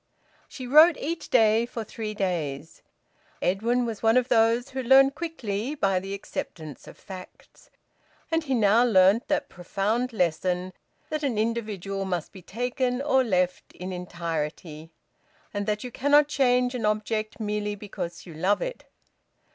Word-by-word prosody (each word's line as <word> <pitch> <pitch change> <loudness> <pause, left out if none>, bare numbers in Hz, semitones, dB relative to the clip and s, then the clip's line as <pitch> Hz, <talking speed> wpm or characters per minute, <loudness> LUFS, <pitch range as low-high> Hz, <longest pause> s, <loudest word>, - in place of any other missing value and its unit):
She 255 - -8
wrote 310 +6 +7
each 330 +3 -4
day 225 -1 +4
for 235 -2 -5
three 215 0 -6
days. 160 -6 -3 0.6
Edwin 230 +7 +1
was 225 -3 -5
one 225 +2 +4
of 250 +1 +1
those 235 +2 +3
who 265 0 -4
learn 265 +2 +6
quickly, 275 -6 -4
by 195 -8 +1
the 195 +1 -5
acceptance 155 -6 -7
of - - -12
facts. 185 -2 -12 0.6
And 325 0 +1
he 270 -4 -1
now 220 +1 +4
learnt 200 -1 +4
that - - 0
profound 210 +8 -2
lesson 180 -1 -1 0.4
that 310 -1 -1
an 265 -7 -1
individual 210 -4 -2
must 180 -4 -3
be 190 - -12
taken 245 +5 -2
or 270 -2 +3
left 180 -5 -1
in 185 +1 -6
entirety, 165 -2 -5 0.6
and 205 0 -3
that 210 0 -1
you 250 - -6
cannot 285 +4 +4
change 250 -3 +2
an 230 -4 -1
object 215 +1 -2
merely 210 -1 -2
because 195 -4 -7
you 170 - -10
love 185 +6 +1
it. - - -6
215 Hz, 150 wpm, -26 LUFS, 185-250 Hz, 0.6 s, wrote